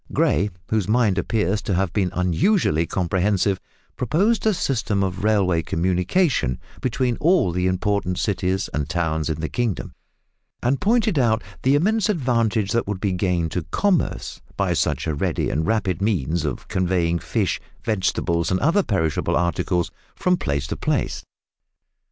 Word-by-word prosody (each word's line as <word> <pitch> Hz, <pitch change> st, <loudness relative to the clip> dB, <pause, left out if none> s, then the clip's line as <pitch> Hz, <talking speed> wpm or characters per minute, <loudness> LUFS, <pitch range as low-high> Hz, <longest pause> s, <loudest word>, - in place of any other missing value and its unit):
Gray, 100 Hz, -, +2 dB, 0.2 s
whose 110 Hz, -3 st, 0 dB
mind 110 Hz, -4 st, +2 dB
appears 105 Hz, 0 st, 0 dB
to 95 Hz, -, -1 dB
have 90 Hz, -2 st, 0 dB
been 95 Hz, -3 st, +1 dB
unusually 90 Hz, -, +2 dB
comprehensive, 95 Hz, +2 st, +1 dB, 0.4 s
proposed 195 Hz, -, +1 dB
a 215 Hz, -, +4 dB
system 115 Hz, -, 0 dB
of 95 Hz, 0 st, -3 dB
railway 95 Hz, -6 st, +2 dB
communication 90 Hz, -, +1 dB, 0.2 s
between 125 Hz, -1 st, 0 dB
all 170 Hz, -, +3 dB
the 90 Hz, +1 st, 0 dB
important 95 Hz, -1 st, 0 dB
cities 95 Hz, -1 st, 0 dB
and 75 Hz, -1 st, -2 dB
towns 80 Hz, -2 st, -1 dB
in 80 Hz, -1 st, -2 dB
the 80 Hz, -, -1 dB
kingdom, 120 Hz, -2 st, -2 dB, 0.7 s
and 130 Hz, +3 st, +1 dB
pointed 215 Hz, -, +2 dB
out 115 Hz, -3 st, +2 dB, 0.2 s
the 135 Hz, +2 st, +3 dB
immense 215 Hz, +8 st, +2 dB
advantage 115 Hz, -, +1 dB
that 115 Hz, -2 st, 0 dB
would 100 Hz, -2 st, -3 dB
be 100 Hz, 0 st, 0 dB
gained 90 Hz, -3 st, 0 dB
to 90 Hz, -, -1 dB
commerce 200 Hz, -, 0 dB, 0.2 s
by -, -, +1 dB
such -, -, 0 dB
a 80 Hz, -, -1 dB
ready 70 Hz, -, -1 dB
and 80 Hz, +2 st, -1 dB
rapid 95 Hz, -4 st, 0 dB
means 85 Hz, -, 0 dB
of 75 Hz, -, -4 dB
conveying 90 Hz, -2 st, 0 dB
fish, 95 Hz, -, -1 dB, 0.2 s
vegetables, 90 Hz, -5 st, 0 dB
and 95 Hz, -, +1 dB
other 170 Hz, +7 st, +3 dB
perishable 80 Hz, -, 0 dB
articles 85 Hz, +1 st, 0 dB, 0.2 s
from 180 Hz, 0 st, +2 dB
place 70 Hz, -, -2 dB
to -, -, -4 dB
place. -, -, -1 dB
95 Hz, 150 wpm, -22 LUFS, 85-120 Hz, 0.7 s, a